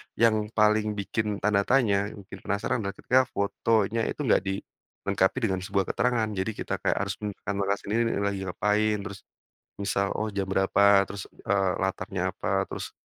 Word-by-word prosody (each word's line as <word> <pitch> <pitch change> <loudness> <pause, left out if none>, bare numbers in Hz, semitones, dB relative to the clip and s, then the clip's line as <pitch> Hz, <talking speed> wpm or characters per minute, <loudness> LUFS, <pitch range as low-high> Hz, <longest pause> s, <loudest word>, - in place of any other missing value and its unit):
yang 110 -2 +3
paling 105 0 +3
bikin 105 +1 -2
tanda 100 -1 +2
tanya, 105 -7 +3
yang 105 -1 -10
bikin - - -11
penasaran 100 +6 0
adalah 100 -2 -4
ketika 130 0 +2
fotonya 110 +2 0
itu 150 - -3
nggak 125 - +4
dilengkapi 95 +1 -2
dengan 95 -4 +1
sebuah 95 +1 0
keterangan. 120 -2 +1
Jadi 95 +1 -2
kita - - -3
kayak - - 0
harus 100 -1 -3
menambahkan 100 -1 -2
sendiri 110 +4 0 0.2
lagi 100 -1 -2
ngapain, 105 +3 +1
terus 100 -1 -7 0.6
misal, 100 -1 0
oh 110 - -1
jam 100 -1 -1
berapa? 100 +1 +4
Terus, 100 -1 -6 0.2
eee, 95 -1 +2
latarnya 95 -1 -2
apa? - - 0
Terus, - - -6
100 Hz, 160 wpm, -27 LUFS, 100-110 Hz, 0.6 s, nggak